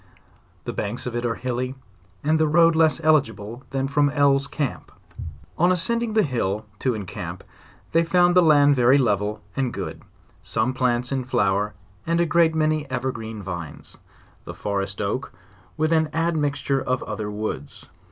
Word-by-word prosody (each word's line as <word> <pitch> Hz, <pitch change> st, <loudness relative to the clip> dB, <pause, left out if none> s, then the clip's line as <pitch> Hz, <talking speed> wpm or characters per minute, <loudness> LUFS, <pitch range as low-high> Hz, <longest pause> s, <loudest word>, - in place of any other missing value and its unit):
The -, -, -4 dB
banks -, -, -3 dB
of 125 Hz, -1 st, -4 dB
it 120 Hz, 0 st, -1 dB
are 115 Hz, -, -1 dB
hilly, 125 Hz, +1 st, -3 dB, 0.5 s
and 155 Hz, +2 st, +2 dB
the 155 Hz, -, +3 dB
road 165 Hz, +1 st, +5 dB
less 160 Hz, -1 st, +4 dB
eligi 155 Hz, -2 st, +3 dB
ble 110 Hz, +4 st, -9 dB
than 135 Hz, 0 st, -1 dB
from 145 Hz, +1 st, +2 dB
Elles' 140 Hz, -1 st, +3 dB
camp. 145 Hz, -1 st, -4 dB, 0.7 s
On 175 Hz, +2 st, +4 dB
ascending 225 Hz, +6 st, 0 dB
the 215 Hz, -1 st, +4 dB
hill, 110 Hz, -6 st, -1 dB
to 130 Hz, -3 st, 0 dB
encamp, 100 Hz, -4 st, -6 dB, 0.5 s
they 165 Hz, +1 st, +4 dB
found 175 Hz, +1 st, +3 dB
the 180 Hz, -, +7 dB
land 145 Hz, -3 st, +5 dB
ve 125 Hz, -, 0 dB
ry 125 Hz, +3 st, +6 dB
level 105 Hz, -4 st, 0 dB
and 130 Hz, -3 st, 0 dB
good, -, -, -6 dB, 0.4 s
some 115 Hz, +3 st, -1 dB
plants 125 Hz, -1 st, 0 dB
in 135 Hz, -1 st, -1 dB
flower,, 105 Hz, -3 st, 0 dB, 0.3 s
and 170 Hz, 0 st, +1 dB
a 170 Hz, -, +3 dB
great 165 Hz, -1 st, +3 dB
many 155 Hz, -2 st, 0 dB
evergreen 115 Hz, -4 st, -4 dB
vines; 85 Hz, -5 st, -7 dB, 0.4 s
the -, -, -8 dB
forest 100 Hz, -1 st, -2 dB
oak 125 Hz, +7 st, -3 dB, 0.4 s
with 155 Hz, +1 st, +1 dB
an 160 Hz, -1 st, +2 dB
admixture 145 Hz, -4 st, 0 dB
of 130 Hz, 0 st, -1 dB
other 105 Hz, -1 st, -4 dB
woods. 105 Hz, -10 st, -5 dB
135 Hz, 165 wpm, -23 LUFS, 110-155 Hz, 0.7 s, the